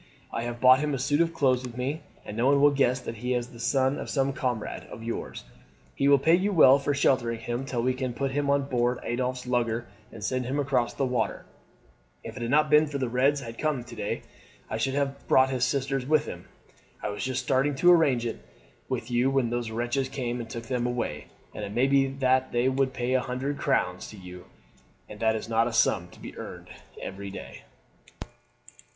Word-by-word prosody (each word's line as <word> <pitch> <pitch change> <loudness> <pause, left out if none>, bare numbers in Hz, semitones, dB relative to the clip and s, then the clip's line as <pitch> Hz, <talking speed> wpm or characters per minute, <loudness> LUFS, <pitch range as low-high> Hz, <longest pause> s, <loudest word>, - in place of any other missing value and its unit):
I - - -2
have 120 0 -5
brought 130 +1 +7
him 150 -1 -1
a - - -2
suit 145 +4 +1
of 165 -1 +2
clothes 130 -5 +2
with 125 -2 -8
me, 140 +6 -2 0.2
and 105 - -7
no 120 +3 +2
one 140 0 +4
will 145 +1 +6
guess 135 -2 +2
that 115 -2 -6
he 125 +3 -1
is 120 0 -2
not - - -17
the 115 - -12
son 135 +2 +1
of - - -6
some 135 -1 +1
comrade 125 -5 -3
of 115 - -9
yours. 115 0 -5 0.5
He 140 - +1
will 140 0 +7
pay 160 +5 +3
you 190 +4 +3
well 140 -6 +7
for 140 +1 -1
sheltering 120 -4 +2
him 120 +3 -3
till 120 -3 -2
we 130 +1 +2
can 130 -2 -3
put 135 +1 -1
him 145 +1 -1
on 140 0 +3
board 125 -2 0
Adolphe's 125 +1 -2
lugger 120 -2 0 0.3
and 110 -2 -10
send 130 +3 -1
him 130 +3 -2
across 130 -4 0
the 135 - 0
water. 125 -3 -1 0.8
If - - -8
it 130 - -7
had 120 - -2
not 150 +2 +3
been 150 +1 +6
that 145 -1 -4
the 130 -2 -1
Reds 135 +4 +2
had 115 -2 -8
come 150 -5 0
to 120 -1 -11
day 105 - -3 0.5
I - - -1
should 135 +4 -1
have 140 -1 -2
brought 130 0 +5
his 125 -2 +1
sisters 135 0 -1
with 155 0 +3
him. - - -8 0.6
I - - -1
was 105 - -4
just 130 0 -2
starting 135 +2 +1
to 175 +6 +5
arrange 140 -9 +4
it 115 - -5 0.5
with 115 - -3
you 120 +2 +3
when 135 -4 +1
those 120 -1 -2
wretches 120 +4 -1
came 125 -2 -3
and 115 - -8
took 115 0 -6
them 125 0 -1
away, 120 -12 -3 0.3
and 105 - -6
it 100 0 -5
may 125 +4 +3
be 135 0 +3
that 130 -1 +1
they 120 +1 +2
would 135 0 +1
pay 125 0 -1
a 130 - +3
hundred 135 +3 -3
crowns 90 -10 0
to 110 - -11
you, 90 -1 -11 0.6
and 105 - -10
that 110 -1 +2
is 110 - -4
not 115 0 +2
a - - -2
sum 95 -6 +2
to - - -17
be - - -9
earned - - -9 0.3
every 100 +1 -6
day." 95 - -10
130 Hz, 230 wpm, -27 LUFS, 120-140 Hz, 0.8 s, brought